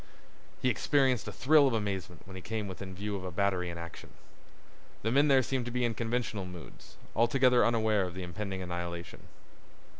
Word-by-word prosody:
He 130 Hz, -, +4 dB
experienced 130 Hz, -2 st, +2 dB
a -, -, -3 dB
thrill 145 Hz, +1 st, +5 dB
of 125 Hz, -, +1 dB
amazement 95 Hz, -5 st, -3 dB
when 95 Hz, 0 st, -10 dB
he 95 Hz, -, -7 dB
came 110 Hz, +1 st, -3 dB
within 95 Hz, 0 st, -7 dB
view 100 Hz, +2 st, -3 dB
of 95 Hz, -, -5 dB
a 95 Hz, -, -4 dB
battery 95 Hz, -1 st, 0 dB
in 85 Hz, -, -6 dB
action. 85 Hz, 0 st, -9 dB, 0.9 s
The 110 Hz, -, +1 dB
men 140 Hz, +4 st, +4 dB
there 135 Hz, -2 st, +5 dB
seemed 130 Hz, -1 st, -1 dB
to 120 Hz, -, -4 dB
be 125 Hz, 0 st, 0 dB
in 115 Hz, -, 0 dB
conventional 115 Hz, -3 st, -2 dB
moods, 90 Hz, -2 st, -11 dB, 0.2 s
altogether 125 Hz, +1 st, +4 dB
unaware 110 Hz, -4 st, +2 dB
of 90 Hz, -, -9 dB
the 95 Hz, -, -5 dB
impending 95 Hz, +2 st, -4 dB
annihilation. 85 Hz, -1 st, -6 dB
105 Hz, 185 wpm, -31 LUFS, 90-120 Hz, 0.9 s, thrill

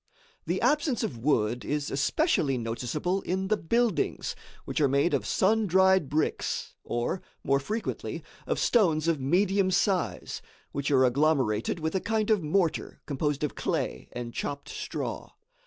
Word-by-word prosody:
The 175 Hz, +3 st, 0 dB
absence 280 Hz, 0 st, +2 dB
of 125 Hz, -, -3 dB
wood 120 Hz, -2 st, +1 dB
is 150 Hz, 0 st, -2 dB
especially 140 Hz, -, +1 dB
noticeable 125 Hz, +11 st, -2 dB
in 190 Hz, +1 st, -2 dB
the 215 Hz, -, +4 dB
buildings, 235 Hz, -, 0 dB, 0.3 s
which -, -, -2 dB
are 145 Hz, -, +5 dB
made 140 Hz, +4 st, +2 dB
of 120 Hz, -7 st, 0 dB
sun 215 Hz, +2 st, +2 dB
dried 190 Hz, -4 st, +4 dB
bricks, 155 Hz, +2 st, -1 dB
or, 120 Hz, +10 st, -2 dB, 0.2 s
more 140 Hz, 0 st, +2 dB
frequently, 215 Hz, +11 st, -4 dB, 0.2 s
of -, -, 0 dB
stones 165 Hz, -9 st, +3 dB
of 165 Hz, -3 st, +2 dB
medium 190 Hz, +7 st, +2 dB
size 190 Hz, 0 st, 0 dB, 0.3 s
which 140 Hz, +1 st, -2 dB
are 130 Hz, -2 st, +5 dB
agglomerated 130 Hz, -2 st, +1 dB
with 160 Hz, 0 st, -2 dB
a 190 Hz, -, +1 dB
kind 220 Hz, 0 st, 0 dB
of 210 Hz, -3 st, +3 dB
mortar 165 Hz, +2 st, 0 dB
composed 145 Hz, 0 st, -1 dB
of 150 Hz, -, -1 dB
clay -, -, -2 dB
and 120 Hz, -1 st, -6 dB
chopped 145 Hz, 0 st, -4 dB
straw. -, -, -5 dB
155 Hz, 150 wpm, -28 LUFS, 140-195 Hz, 0.3 s, are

